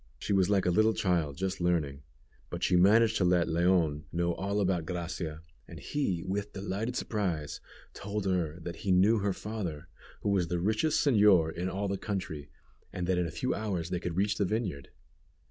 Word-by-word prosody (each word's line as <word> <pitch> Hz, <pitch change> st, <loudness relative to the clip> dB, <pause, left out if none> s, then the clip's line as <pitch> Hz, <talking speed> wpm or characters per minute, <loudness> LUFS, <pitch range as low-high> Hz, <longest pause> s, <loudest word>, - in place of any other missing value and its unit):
She -, -, -2 dB
was 95 Hz, -1 st, +3 dB
like 100 Hz, -2 st, +2 dB
a 90 Hz, -, +3 dB
little 110 Hz, +4 st, +3 dB
child 85 Hz, -7 st, 0 dB
just 95 Hz, 0 st, -2 dB
learning, 80 Hz, -6 st, 0 dB, 0.5 s
but -, -, -5 dB
she -, -, +3 dB
managed 110 Hz, +5 st, +5 dB
to -, -, +1 dB
let 90 Hz, -1 st, +3 dB
Leon 85 Hz, -3 st, +2 dB
know 85 Hz, 0 st, 0 dB
all 100 Hz, +3 st, -2 dB
about 90 Hz, -4 st, +1 dB
Gracia, 85 Hz, -2 st, -4 dB, 0.2 s
and -, -, -10 dB
he, 95 Hz, -, -2 dB
with 100 Hz, +2 st, -3 dB
delighted 100 Hz, +5 st, -3 dB
surprise, 90 Hz, -, -2 dB, 0.3 s
told 105 Hz, 0 st, -4 dB
her 90 Hz, -4 st, -1 dB
that 85 Hz, 0 st, -6 dB
he 95 Hz, +3 st, -2 dB
knew 100 Hz, +5 st, +5 dB
her 100 Hz, 0 st, 0 dB
father, 95 Hz, -7 st, -5 dB, 0.3 s
who -, -, -1 dB
was 95 Hz, -4 st, +2 dB
the 90 Hz, -, -1 dB
richest 110 Hz, -, +1 dB
señor 100 Hz, -, +5 dB
in 90 Hz, +2 st, -2 dB
all 100 Hz, +2 st, -2 dB
the 100 Hz, -1 st, -2 dB
country, 90 Hz, -8 st, -4 dB, 0.4 s
and 90 Hz, -, -3 dB
that 90 Hz, 0 st, +1 dB
in 90 Hz, -, 0 dB
a 85 Hz, 0 st, -9 dB
few -, -, 0 dB
hours 95 Hz, -6 st, -3 dB
they 90 Hz, -, 0 dB
could 90 Hz, -1 st, -4 dB
reach 100 Hz, +1 st, +1 dB
the 100 Hz, -, +3 dB
vineyard. 95 Hz, -, -3 dB
90 Hz, 195 wpm, -30 LUFS, 85-100 Hz, 0.5 s, managed